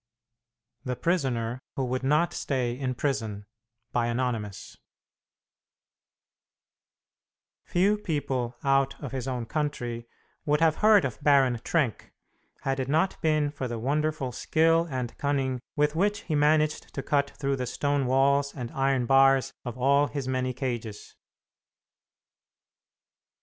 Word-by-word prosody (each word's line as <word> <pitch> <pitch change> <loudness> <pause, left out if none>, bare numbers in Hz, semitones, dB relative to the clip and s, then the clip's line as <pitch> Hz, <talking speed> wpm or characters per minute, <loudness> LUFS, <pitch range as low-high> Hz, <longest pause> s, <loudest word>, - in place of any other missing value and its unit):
THE 125 -1 -3
PRISONER 125 -7 -1 0.2
WHO 135 - -1
WOULD 130 +1 -2
NOT 155 +6 +2
STAY 130 -4 -1
IN 130 0 -3
PRISON 110 -7 -2 0.5
ANONYMOUS 120 -4 -2 2.9
Few 200 +4 +2
people 130 - -2
out 135 0 +2
of 140 - -6
his 130 -1 -4
own 125 -3 -3
country 120 -4 -3 0.4
would 150 0 +1
have 160 -1 +3
heard 210 -4 +5
of 130 +1 -5
Baron 135 -4 +4
Trenck 145 -10 -1 0.5
had 135 0 -1
it 130 - -2
not 160 +6 +1
been 155 -2 +2
for 140 -3 -4
the 120 -1 -4
wonderful 145 +2 -1
skill 165 +5 +2
and 130 -3 -4
cunning 135 -3 0 0.2
with 150 +1 +1
which 205 +4 +1
he 160 - -4
managed 150 +1 +2
to 135 - -3
cut 140 -1 +1
through 140 -1 -1
the 125 -1 -3
stone 145 +1 0
walls 140 +2 +2
and 120 -3 -5
iron 135 -2 +1
bars 135 +1 +4
of 120 -1 -6
all 140 +3 +3
his 140 -3 -4
many 130 0 -1
cages. 120 -5 -5
135 Hz, 130 wpm, -27 LUFS, 125-150 Hz, 2.9 s, heard